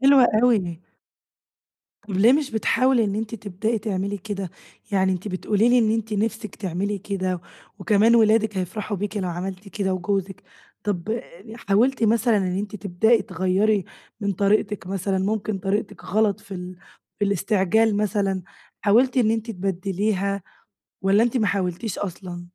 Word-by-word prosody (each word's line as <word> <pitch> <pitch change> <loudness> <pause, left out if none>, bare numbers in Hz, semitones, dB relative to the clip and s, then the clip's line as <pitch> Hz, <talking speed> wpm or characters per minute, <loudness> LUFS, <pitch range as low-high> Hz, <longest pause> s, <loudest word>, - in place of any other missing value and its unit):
حلوة 270 -1 +7 0.2
أوي. 185 -9 +2 1.3
طب 195 - -2
ليه 230 +5 +6
مش 290 -1 +1
بتحاولي 235 +2 +2
إن 200 -1 -1
أنتِ 220 +1 -3
تبدئي 215 +2 -2
تعملي 200 -1 -2
كده؟ 195 -2 -5 0.4
يعني 190 -1 +3
أنتِ 185 +3 -4
بتقولي 205 +4 +1
لي 245 0 +5
إن 220 -2 +3
أنتِ 225 -1 -1
نِفسِك 215 0 -2
تعملي 195 +2 -2
كده، 185 -3 -2 0.4
وكمان 220 +2 +4
ولادك 220 -2 +4
هيفرحوا 200 +3 -3
بيكِ 205 +2 -4
لو 185 -3 -1
عملتِ 185 +3 -5
كده 190 -2 -1
وجوزِك، 195 +1 -2 0.4
طَب 210 +3 -2 0.3
حاولتِ 235 +3 +2
مثلًا 230 +1 +3
إن 185 -2 0
أنتِ 210 +1 -4
تبدئي 210 +4 +2
تغيَّري 190 +1 +1 0.4
من 200 -1 0
طريقتِك 205 +1 +1
مثلًا، 195 0 -1
ممكن 205 +1 -1
طريقتِك 200 +1 -2
غلط 210 0 +1
في 195 - -9
ال 180 0 -7 0.4
في 205 - +1
الاستعجال 200 +2 +2
مثلًا، 200 -2 0 0.4
حاولتِ 240 +6 +3
إن 235 -4 +4
أنتِ 225 +1 -1
تبدّليها 195 +1 -1 0.6
والّا 195 +3 +4
أنتِ 240 +2 +1
ما 220 -4 +2
حاولتيش 185 +2 -2
أصلًا؟ 180 -2 -6
205 Hz, 145 wpm, -23 LUFS, 190-220 Hz, 1.3 s, حلوة